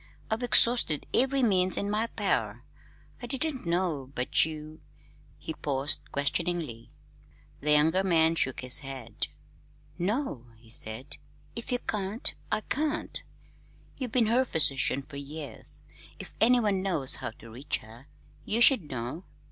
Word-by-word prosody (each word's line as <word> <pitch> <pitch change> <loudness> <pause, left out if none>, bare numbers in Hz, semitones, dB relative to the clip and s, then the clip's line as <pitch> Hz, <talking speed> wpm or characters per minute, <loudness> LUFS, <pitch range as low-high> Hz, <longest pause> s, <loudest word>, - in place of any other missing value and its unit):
I've 220 +2 0
exhausted 235 - +4
every 270 +1 +3
means 185 -4 +4
in 200 - -1
my 215 +3 0
power. - - -1 0.6
I 245 - -5
didn't 270 - -1
know 170 -6 -1
but 125 - +3
you 155 0 -8 0.3
" - - -29
He 160 - -6
paused 140 -2 0
questioningly. 145 -4 -2 0.7
The 150 +1 +2
younger 160 +6 +3
man 165 -3 +3
shook 130 -5 -1
his 125 +2 0
head. 130 -6 -4 0.7
"No," 190 - -2
he 110 0 -19
said. 115 +4 -7 0.4
"If 235 - -5
you 245 - +2
can't, 210 -2 -1 0.2
I 215 - +1
can't. 305 +6 -2 0.8
You've 255 -4 -3
been 240 -1 +3
her 240 +4 +3
physician 140 - +2
for 140 +1 -10
years. 140 -3 -1 0.4
If - - -9
anyone 220 -5 +4
knows 165 -9 +2
how - - -4
to 115 - -13
reach 130 +6 -3
her, 115 +6 -15 0.4
you 220 +3 -1
should 240 - +6
know. 130 +7 -5
165 Hz, 140 wpm, -28 LUFS, 135-225 Hz, 0.8 s, should